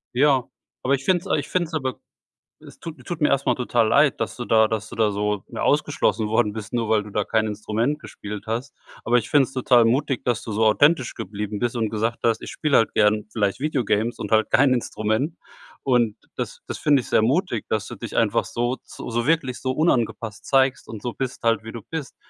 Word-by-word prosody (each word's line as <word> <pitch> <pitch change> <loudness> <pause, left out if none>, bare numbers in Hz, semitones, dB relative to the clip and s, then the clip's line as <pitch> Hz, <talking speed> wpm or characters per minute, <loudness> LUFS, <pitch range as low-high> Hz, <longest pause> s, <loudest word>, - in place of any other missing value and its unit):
Ja. 135 -1 +4 0.4
Aber 130 - +2
ich 135 - -7
finde 185 -1 +3
es - - -11
ei - - +2
ich 145 - -4
find 180 -2 0
es 160 - -16
aber 130 -5 -2 0.6
es - - -14
tut 155 -6 -9
tut 170 -2 -5
mir 150 - +4
erst 140 0 +1
mal - - +3
total 120 -2 +1
leid, 140 +3 +3
dass - - -2
du 120 - -4
da 110 0 +4
dass 110 0 -3
du - - -10
da 110 -2 +2
so 105 -1 -1
mehr - - -5
ausgeschlossen 110 - +1
worden 110 -1 +1
bist, 110 +2 -7
nur 115 -2 -1
weil 110 -1 +3
du 105 - -10
da 105 +1 -1
kein 110 -1 +1
Instrument 110 +7 -1
gespielt 105 -8 -8
hast. 120 +5 -3 0.3
Aber 120 +2 +3
ich 120 - -2
finde 145 -2 +5
es - - -13
total 125 -2 +4
mutig 130 +3 +1
dass 120 -3 -1
du 110 - -6
so 110 +2 +1
authentisch 135 +4 +3
geblieben 105 +1 -5
bist 120 +1 -1
und 115 -2 0
gesagt 110 +2 -2
hast: 115 -1 +2
„Ich - - -7
spiele 150 -2 +2
halt 115 - +2
gern 105 0 +3
vielleicht 100 -1 0
Video 145 -2 0
games 110 +3 0
und - - -5
halt 110 0 +3
kein 135 0 +5
Instrument.“ 120 +5 -1 0.5
Und, 120 -5 +2 0.2
das - - -5
das - - -4
finde 145 -3 +3
ich - - -11
sehr - - +3
mutig, 130 - 0
dass 110 -1 -1
du - - -7
dich 115 - -7
einfach 115 0 +2
so 120 +2 -2
so 120 0 -4
wirklich 145 -5 +1
so 130 - -1
unangepasst 120 -7 0
zeigst 135 0 +2
und 110 -2 -8
so 120 -1 -4
bist 130 -2 -4
halt, 115 -2 +2
wie 110 - -8
du 115 - -7
bist. 155 +5 -6
120 Hz, 235 wpm, -23 LUFS, 110-135 Hz, 0.6 s, finde